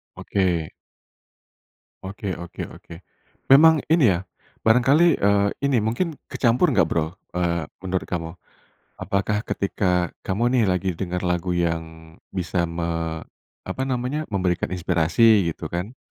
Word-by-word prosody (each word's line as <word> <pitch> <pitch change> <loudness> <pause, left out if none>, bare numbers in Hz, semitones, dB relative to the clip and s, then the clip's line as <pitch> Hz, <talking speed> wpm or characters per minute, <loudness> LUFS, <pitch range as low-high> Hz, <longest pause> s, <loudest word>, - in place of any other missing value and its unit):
Oke. 90 -5 -1 1.3
Oke 95 -2 -5
oke 85 0 -8
oke. 85 - -13 0.6
Memang 155 +2 +7
ini 140 - +5
ya, 85 - -2 0.4
barangkali, 135 +9 +4
eee, 100 0 +3 0.2
ini 130 -6 +2
mungkin 120 - -1 0.2
kecampur 120 -1 +2
nggak, - - +3
Bro, 80 +2 -2 0.2
eee, 85 -3 -1 0.2
menurut 95 -1 -2
kamu? 80 -2 -4 0.7
Apakah 105 +2 0
ketika 90 -5 -1
kamu 120 +6 0
nih 120 -3 +4
lagi 90 +1 0
denger 90 +1 -4
lagu 90 +1 -1
yang 85 -1 0 0.5
bisa 90 -2 -2
me 85 -1 -3 0.4
apa 95 +8 -4
namanya, 130 +4 -2
memberikan 90 -4 -1
inspirasi, 90 +3 +3
gitu 80 - -7
kan, 95 +9 -5
95 Hz, 125 wpm, -23 LUFS, 85-115 Hz, 1.3 s, Memang